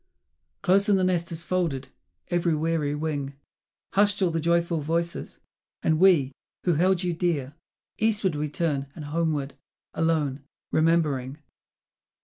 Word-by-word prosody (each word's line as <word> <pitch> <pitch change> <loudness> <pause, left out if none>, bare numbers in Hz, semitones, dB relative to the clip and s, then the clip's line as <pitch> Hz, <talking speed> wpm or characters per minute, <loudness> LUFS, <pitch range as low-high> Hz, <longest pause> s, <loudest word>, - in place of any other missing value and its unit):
Close 200 +3 +3
in 205 - +5
the 190 - +2
nest 175 -2 0
is 165 0 -6
folded 165 -8 -1 0.4
every 175 -2 +1
weary 155 -2 0
wing, 145 -3 -3 0.6
Hushed 205 0 +3
all 185 -3 +2
the 165 - -1
joyful 170 0 +1
voices; 170 +3 -2 0.5
and 155 -1 +2
we, 170 -8 +5 0.3
who 175 - +2
held 180 +3 +2
you 175 -1 0
dear, 160 -6 -1 0.5
Eastward 210 -4 +1
we 150 0 -2
turn 145 -3 -1
and 155 - -7
homeward, 150 -2 -1 0.4
alone, 150 -4 0 0.3
remembering 150 -5 +1
165 Hz, 130 wpm, -26 LUFS, 150-175 Hz, 0.6 s, in